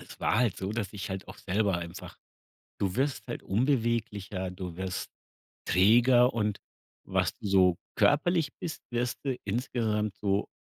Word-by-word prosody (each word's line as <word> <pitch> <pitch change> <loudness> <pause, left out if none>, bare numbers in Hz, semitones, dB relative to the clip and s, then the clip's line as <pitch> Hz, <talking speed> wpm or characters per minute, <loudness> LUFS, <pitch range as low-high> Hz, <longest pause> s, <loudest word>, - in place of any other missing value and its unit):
es - - -12
war 110 - +2
halt 120 -5 +2
so, 95 +2 -3
dass 110 -3 -3
ich 100 -1 -5
halt 95 +1 -5
auch - - -9
selber 100 -2 +1
einfach 85 +1 -8 0.6
du 95 -1 0
wirst 135 +1 0
halt 120 - -5
unbeweglicher, 110 -5 0
du 90 -2 -6
wirst 95 0 -4 0.6
träger 120 +6 +5
und 105 -3 0 0.5
was - - +1
du - - -5
so 95 -3 +4 0.2
körperlich 160 +1 +3
bist, 160 - -5
wirst 120 0 -1
du 135 -3 -1
insgesamt 110 -2 -1
so 100 -1 +1
105 Hz, 155 wpm, -29 LUFS, 95-120 Hz, 0.6 s, träger